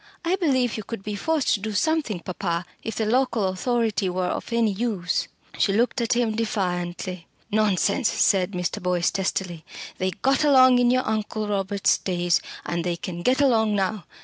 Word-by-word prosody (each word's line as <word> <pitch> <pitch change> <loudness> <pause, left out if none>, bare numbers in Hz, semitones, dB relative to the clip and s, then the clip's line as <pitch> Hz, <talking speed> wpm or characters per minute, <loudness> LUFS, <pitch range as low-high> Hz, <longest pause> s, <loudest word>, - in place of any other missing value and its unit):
I 350 +3 +2
believe 260 - +1
you 215 - -5
could 210 -1 -7
be 210 - -4
forced 310 +7 +1
to - - 0
do 215 +2 -4
something, 295 - 0
papa 175 -1 -3 0.2
if 225 - -5
the 220 - -1
local 230 -3 +1
authority 215 0 0
were 180 0 -1
of - - -4
any 230 -2 +2
use." 195 -4 -1 0.3
She 195 - +3
looked 235 +3 +1
at 230 - +1
him 235 -3 +1
defiantly. 180 -5 -3 0.2
"Nonsense," 210 +2 +2
said 190 -1 +2
Mr. 180 -1 -2
Boyce 180 -1 +1
testily. 185 -3 -2 0.4
"They 185 - +1
got 270 - +1
along 260 -3 +6
in 245 -1 +4
your 255 +1 +1
Uncle 215 0 -2
Robert's 200 -1 +1
days, 175 -2 0 0.2
and 170 -1 -2
they 175 0 -1
can 175 0 -6
get 255 +9 +2
along 220 -6 +3
now. 195 -2 -1
210 Hz, 175 wpm, -24 LUFS, 185-240 Hz, 0.4 s, along